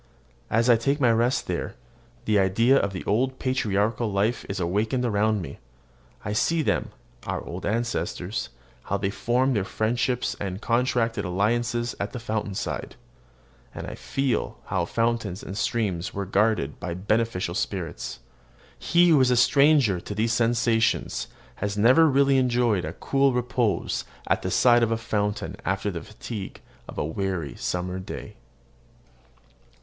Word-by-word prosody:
As 115 +2 +2
I 120 -2 +6
take 140 +6 0
my 125 -4 +4
rest 120 +3 +1
there, - - -3 0.5
the 105 -2 +3
idea 115 +7 +4
of 100 -7 +2
the 95 - -6
old 130 +5 +1
patriarchal 110 -3 0
life 105 +5 0
is 100 0 -3
awakened 105 +8 0
around 105 -2 +1
me. 70 - -9 0.7
I 105 - -2
see 160 +9 +1
them, - - 0 0.4
our - - -2
old 90 +3 -5
ancestors, 105 -3 -2 0.4
how 100 - 0
they 100 -1 -1
formed 125 +5 +1
their 100 - +1
friendships 120 +5 -1
and 95 -1 -4
contracted 115 -2 +1
alliances 120 +5 0
at 100 - -3
the 125 - -4
fountain 110 -3 -3
side; - - -4 0.8
and - - -5
I - - -6
feel 135 -2 -2
how 90 -2 -1
fountains 115 -2 -1
and 95 - -6
streams 100 -5 -1
were 100 0 -2
guarded 100 -7 +1
by 85 -1 -4
beneficent 100 -2 0
spirits. 90 -8 -4 0.6
He 175 +1 +4
who 150 -5 +6
is 130 - +4
a 125 - +3
stranger 140 - +4
to 105 - -7
these 115 +2 +1
sensations 115 -1 +1 0.3
has 105 0 -3
never 130 +10 +6
really 140 -1 +4
enjoyed 120 -9 +1
cool 135 -1 +2
repose 125 -3 0 0.2
at - - +1
the - - -2
side 120 -1 +5
of 115 - +2
a 115 - +1
fountain 105 -2 -2
after - - -1
the - - -5
fatigue 95 - -7 0.3
of - - -9
a - - 0
weary 85 -1 -3
summer 90 +1 -3
day. 95 - -8
110 Hz, 150 wpm, -25 LUFS, 100-120 Hz, 0.8 s, I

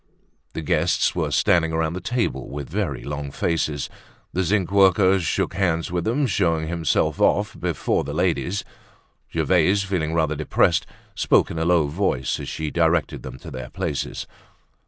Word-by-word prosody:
The 80 - -4
guests - - +2
were - - 0
standing 80 -2 +2
round 80 +1 0
the 95 - -5
table 90 - -2
with 70 0 -6
very 85 -8 -3
long 75 0 -4
faces. 75 -1 -1 0.5
The 95 - +1
zinc 95 0 +1
worker 95 -1 +5
shook 85 - -1
hands 85 -4 0
with 85 -1 -1
them, 135 +6 +1
showing 85 -9 +1
himself 85 -2 0
off - - +2
before - - 0
the 70 - -5
ladies. 90 +4 0 0.7
Gervaise, 100 +1 +2
feeling 85 -5 -1
rather 80 -2 +1
depressed, 75 +1 +2 0.3
spoke - - +2
in 80 - -4
a 80 - 0
low 85 -3 +4
voice 70 -4 -1
as - - -5
she 80 -1 -4
directed 80 -1 +1
them - - -8
to - - -10
their 65 -1 -7
places. - - -3
85 Hz, 160 wpm, -23 LUFS, 75-95 Hz, 0.7 s, worker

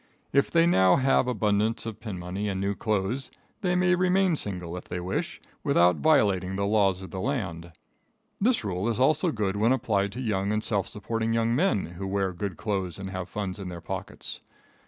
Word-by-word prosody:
If 140 - +3
they 165 0 +4
now 95 - +5
have 135 -1 +3
abundance 110 -1 +1
of 115 -2 -6
pin 105 -5 -6
money 90 +4 -3
and 95 -1 -2
new 100 +1 0
clothes, 110 +5 -1 0.3
they 180 -3 +1
may 180 0 +3
remain 185 0 +3
single 90 - -4
if 90 - -7
they 90 - -4
wish 90 +2 -3 0.2
without 90 +1 +4
violating 100 - +3
the 100 +1 0
laws 100 -3 +2
of 95 - -9
the 95 - -5
land. 95 -10 -3 0.7
This 230 - +2
rule 100 +2 -1
is 115 - -1
also 155 +6 +3
good 105 -6 -1
when 110 +4 +3
applied 110 -6 +1
to 125 - -6
young 105 -5 0
and 105 0 0
self 100 -4 0
supporting 115 +1 -2
young 115 0 +2
men 165 - +2
who 90 +3 -6
wear 95 -1 0
good 95 -1 -4
clothes 95 -5 -2
and 95 -1 -6
have 95 -1 -5
funds 95 0 -4
in 95 -2 -5
their 85 -1 -6
pockets. - - -6
105 Hz, 200 wpm, -27 LUFS, 95-125 Hz, 0.7 s, now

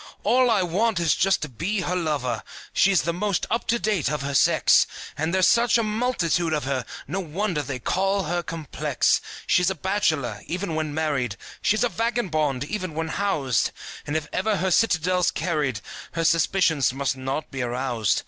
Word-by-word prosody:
All 255 0 +4
I 210 -5 +3
want 195 +4 +1
is 165 -3 +3
to - - -4
just 155 - +1
be 200 +4 0
her 180 +1 -1
lover! 145 -9 -1 0.3
She's 195 -2 +4
the 170 - -1
most 200 +2 -1
up 230 - -1
to 235 - +2
date 205 - 0
of 150 -2 -2
her 140 +1 -3
sex, 140 - +4 0.3
And 160 +2 -1
there's 185 0 +4
such 235 0 +4
a 230 - +1
multitude 210 -7 0
of 150 - 0
her, 130 -2 -2 0.2
No 195 - -2
wonder 180 -1 -2
they 145 -3 -4
call 195 +9 0
her 175 +1 -1
complex. 165 -4 0 0.2
She's 180 0 +3
a 190 - -2
bachelor, 155 - -1
even 180 0 -3
when 155 -1 -2
married, 145 -8 -1 0.3
She's 215 +1 +2
a 245 - +2
vagabond, 165 - -1
even 185 0 -4
when 160 0 -2
housed; 150 - 0 0.4
And 145 +2 0
if 155 -1 -4
ever 210 +2 +1
her 185 0 0
citadel's 180 -3 +2
carried 145 - -1 0.3
Her 165 - -1
suspicions 165 -4 +3
must 135 0 -1
not 135 +3 -4
be 135 -1 -4
aroused. 120 -4 0
165 Hz, 180 wpm, -24 LUFS, 145-195 Hz, 0.4 s, All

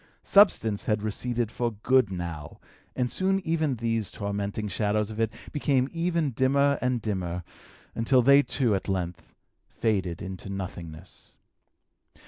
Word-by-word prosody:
Substance 115 - +4
had 105 -1 0
receded 120 +1 -2
for 120 -2 -2
good 125 +2 +2
now, 85 -5 -6 0.4
and 125 -1 +1
soon 195 +1 +1
even 160 -4 +1
these 115 -2 -1
tormenting 100 +1 -3
shadows 105 +2 0
of 110 - -7
it 115 -1 +1 0.2
became 135 -3 +1
ever 170 0 0
dimmer 140 +3 +2
and 125 -3 0
dimmer, 90 -4 -3 0.5
until 125 +2 +3
they 140 +3 +7
too 130 -5 0
at 95 0 -2
length 90 -3 -4 0.3
faded 95 -7 -1
into 95 0 -7
nothingness. 90 -3 -8
110 Hz, 130 wpm, -27 LUFS, 95-130 Hz, 0.5 s, they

